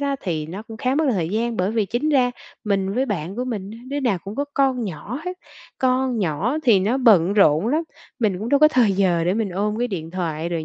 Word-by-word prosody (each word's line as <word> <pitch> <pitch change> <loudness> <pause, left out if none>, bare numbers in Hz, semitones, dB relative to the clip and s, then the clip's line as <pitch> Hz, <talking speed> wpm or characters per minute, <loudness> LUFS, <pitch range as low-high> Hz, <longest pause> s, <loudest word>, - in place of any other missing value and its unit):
đó 280 -1 -1
thì 155 -4 -3
nó 190 +6 -7
cũng 225 -1 -10
khá 255 +1 0
mất 315 +1 +2
thời 170 -5 -1
gian. 230 +3 -1
Bởi 185 +3 0
vì 220 -2 +1
chính 240 +9 -1
ra 255 -4 +3 0.3
mình 195 -1 0
với 265 +2 +1
bạn 190 -1 -4
của 250 - -2
mình 205 -5 -4
á, 225 - -10
đứa 285 +1 -2
nào 235 -9 +1
cũng 200 +3 -7
có 285 - 0
con 265 -4 +1
nhỏ 200 - -6
hết, 365 0 -4 0.4
con 255 -2 +1
nhỏ 190 - 0
thì 215 -6 +5
nó 230 +8 +1
bận 200 -7 +5
rộn 195 -2 +4
lắm, 310 +5 +1 0.4
mình 205 -6 0
cũng 220 +3 -4
đâu 285 +2 +3
có 305 - +8
thời 240 -8 +3
giờ 180 -4 +2
để 180 +3 +1
mình 220 -2 -1
ôm 210 +4 -1
cái 245 0 0
điện 165 -5 -5
thoại 170 -3 -3
rồi 165 -2 -3
215 Hz, 255 wpm, -22 LUFS, 185-255 Hz, 0.4 s, có